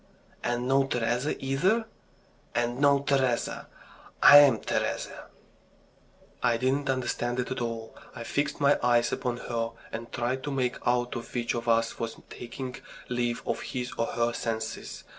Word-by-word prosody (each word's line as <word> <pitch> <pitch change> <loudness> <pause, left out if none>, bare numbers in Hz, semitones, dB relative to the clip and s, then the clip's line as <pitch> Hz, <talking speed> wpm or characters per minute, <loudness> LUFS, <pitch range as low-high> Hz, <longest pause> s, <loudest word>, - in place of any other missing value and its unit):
"And 120 +1 -1
no 135 +1 +3
Teresa 120 +3 0
either?" 185 +13 +2 0.7
"And 120 +1 0
no 140 -1 +5
Teresa. 135 -4 0 0.6
I'm 145 -5 +9
Teresa." - - -3 1.2
I 115 - +3
didn't 135 +3 0
understand 125 -1 -1
it 125 - -2
at 130 - -2
all. 115 -1 -4 0.2
I 120 - -6
fixed 145 +5 -1
my 140 0 +4
eyes 120 -1 +3
upon 125 -1 -2
her, 115 -1 -2 0.2
and 115 +1 -6
tried 125 +2 -1
to 145 - -2
make 130 -2 0
out 120 0 +1 0.2
which 120 -1 0
of 120 0 -4
us 115 0 +2
was 115 -1 -4
taking 125 +1 -6 0.3
leave 120 -1 -1
of - - -2
his 125 -1 -4
or 115 - 0
her 120 0 0
senses. 110 -1 -4
125 Hz, 145 wpm, -28 LUFS, 120-135 Hz, 1.2 s, I'm